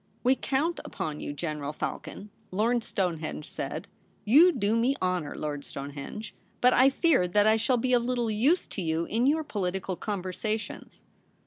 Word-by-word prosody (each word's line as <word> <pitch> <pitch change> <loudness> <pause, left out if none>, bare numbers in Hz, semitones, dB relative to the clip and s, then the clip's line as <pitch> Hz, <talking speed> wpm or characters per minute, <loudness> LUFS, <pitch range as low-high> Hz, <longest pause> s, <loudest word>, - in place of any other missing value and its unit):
' - - -37
We 255 +2 +4
count 290 +6 -1
upon 150 -1 -4
you, - - -4
General 150 -1 -4
Falcon,' 205 +6 -5 0.2
Lord 225 +5 +1
Stonehenge 165 -7 -2
said. - - -4 0.2
* - - -36
You 350 +4 +9
do 225 -7 0
me 245 +4 +2
honour, 180 -5 -1
Lord 145 -2 -4
Stonehenge; 140 +11 -7 0.3
but 250 0 +5
I 260 +2 +6
fear 275 - +3
that 205 +4 +3
I 220 0 +5
shall 230 +3 +2
be 250 +2 0
of 240 -1 +4
little 240 -2 0
use 265 - +2
to 195 - -4
you 165 0 0
in 235 +7 +1
your 315 +2 +2
political 190 -6 -3
conversations.' 210 +3 -4
210 Hz, 175 wpm, -28 LUFS, 175-250 Hz, 0.3 s, You